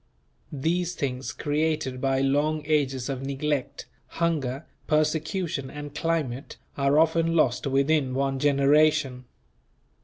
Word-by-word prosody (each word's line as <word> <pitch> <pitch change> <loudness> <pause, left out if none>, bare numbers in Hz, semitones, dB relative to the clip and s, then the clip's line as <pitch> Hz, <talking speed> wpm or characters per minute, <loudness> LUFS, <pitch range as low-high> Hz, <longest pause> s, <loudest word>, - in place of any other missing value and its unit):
These 175 +5 -1
things 130 -1 -3
created 150 -3 -1
by 135 0 +1
long 145 +3 +1
ages 135 -5 0
of 135 -2 -3
neglect, 140 0 -2 0.3
hunger, 155 -4 -1 0.2
persecution 155 -1 0
and 145 0 -8
climate, 150 -5 -2 0.2
are 140 +1 +2
often 165 +1 +3
lost 130 -5 +2
within 135 -1 +1
one 135 0 0
generation. 145 -1 +3
145 Hz, 110 wpm, -26 LUFS, 135-155 Hz, 0.3 s, often